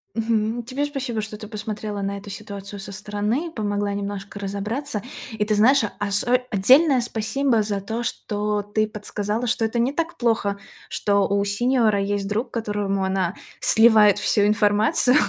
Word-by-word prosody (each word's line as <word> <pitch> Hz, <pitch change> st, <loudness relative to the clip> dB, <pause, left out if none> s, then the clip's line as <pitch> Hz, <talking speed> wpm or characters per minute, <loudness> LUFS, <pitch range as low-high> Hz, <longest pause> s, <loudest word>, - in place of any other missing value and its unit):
Мгм, 225 Hz, +1 st, 0 dB
тебе 260 Hz, +4 st, -3 dB
спасибо, 270 Hz, -6 st, -3 dB
что 210 Hz, 0 st, -6 dB
ты 215 Hz, -, -9 dB
посмотрела 210 Hz, -1 st, -5 dB
на 200 Hz, 0 st, -3 dB
эту 200 Hz, +1 st, -10 dB
ситуацию 200 Hz, -1 st, -8 dB
со 195 Hz, -, -8 dB
стороны, 210 Hz, -, -2 dB
помогла 205 Hz, -5 st, -2 dB
немножко 200 Hz, 0 st, -5 dB
разобраться. 210 Hz, +5 st, -3 dB, 0.3 s
И 210 Hz, -1 st, -1 dB
ты 215 Hz, 0 st, +1 dB
знаешь, 230 Hz, +4 st, +5 dB, 0.2 s
осо 205 Hz, +5 st, +3 dB
отдельное 260 Hz, -, +5 dB
спасибо 230 Hz, +1 st, 0 dB
за 205 Hz, -1 st, -2 dB
то, 225 Hz, +4 st, -4 dB
что 210 Hz, -2 st, -2 dB
ты 215 Hz, +1 st, -1 dB
подсказала, 210 Hz, +2 st, -3 dB
что 230 Hz, 0 st, 0 dB
это 225 Hz, +2 st, 0 dB
не 255 Hz, +4 st, +1 dB
так 335 Hz, +2 st, -3 dB
плохо. 220 Hz, -4 st, 0 dB, 0.3 s
Что 200 Hz, -1 st, +1 dB
у 200 Hz, 0 st, +1 dB
сеньора 220 Hz, 0 st, +2 dB
есть 200 Hz, 0 st, -2 dB
друг, 225 Hz, +4 st, -2 dB
которому 205 Hz, -4 st, -2 dB
она 190 Hz, -2 st, -1 dB, 0.3 s
сливает 220 Hz, -3 st, +6 dB
всю 210 Hz, -, +2 dB
информацию 210 Hz, +6 st, +3 dB
210 Hz, 155 wpm, -23 LUFS, 205-235 Hz, 0.3 s, сливает